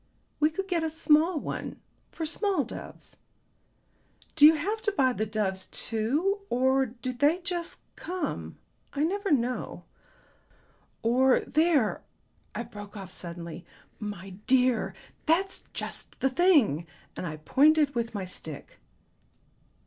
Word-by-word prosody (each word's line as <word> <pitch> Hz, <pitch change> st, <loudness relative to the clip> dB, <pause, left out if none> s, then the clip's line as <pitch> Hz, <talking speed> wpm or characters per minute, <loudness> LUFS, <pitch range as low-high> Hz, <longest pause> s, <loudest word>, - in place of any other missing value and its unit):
"We 305 Hz, -, +4 dB
could 385 Hz, +5 st, -4 dB
get 345 Hz, -4 st, 0 dB
a 320 Hz, -, 0 dB
small 315 Hz, +1 st, +3 dB
one -, -, -5 dB, 0.3 s
for 325 Hz, -, -4 dB
small 370 Hz, 0 st, +1 dB
doves. -, -, -9 dB, 1.2 s
Do 300 Hz, -1 st, +9 dB
you 320 Hz, -, +7 dB
have 410 Hz, +9 st, -2 dB
to 420 Hz, -, 0 dB
buy 260 Hz, -10 st, +2 dB
the 215 Hz, -2 st, -2 dB
doves 200 Hz, -3 st, -2 dB
too, 285 Hz, -, 0 dB
or 260 Hz, +2 st, +3 dB
do 250 Hz, +2 st, -5 dB
they 290 Hz, +8 st, +3 dB
just 350 Hz, -2 st, -4 dB
come? 365 Hz, 0 st, -4 dB, 0.4 s
I 285 Hz, -, 0 dB
never 395 Hz, +5 st, 0 dB
know. 250 Hz, -3 st, 0 dB, 1.2 s
Or 255 Hz, +3 st, +4 dB
there," 310 Hz, -8 st, +2 dB, 0.5 s
I -, -, -2 dB
broke 210 Hz, -3 st, -10 dB
off 190 Hz, -2 st, -8 dB
suddenly; 170 Hz, -1 st, -7 dB, 0.4 s
"my 200 Hz, -3 st, -6 dB, 0.2 s
dear, 250 Hz, -2 st, +3 dB, 0.3 s
that's 375 Hz, +4 st, +1 dB
just -, -, -5 dB
the 265 Hz, -, +2 dB
thing." 260 Hz, -, +4 dB, 0.3 s
And 180 Hz, -, -4 dB
I 155 Hz, -1 st, -5 dB
pointed 290 Hz, -, +4 dB
with 235 Hz, -2 st, -2 dB
my 195 Hz, -2 st, -2 dB
stick. 160 Hz, -5 st, -7 dB
265 Hz, 130 wpm, -28 LUFS, 215-330 Hz, 1.2 s, Do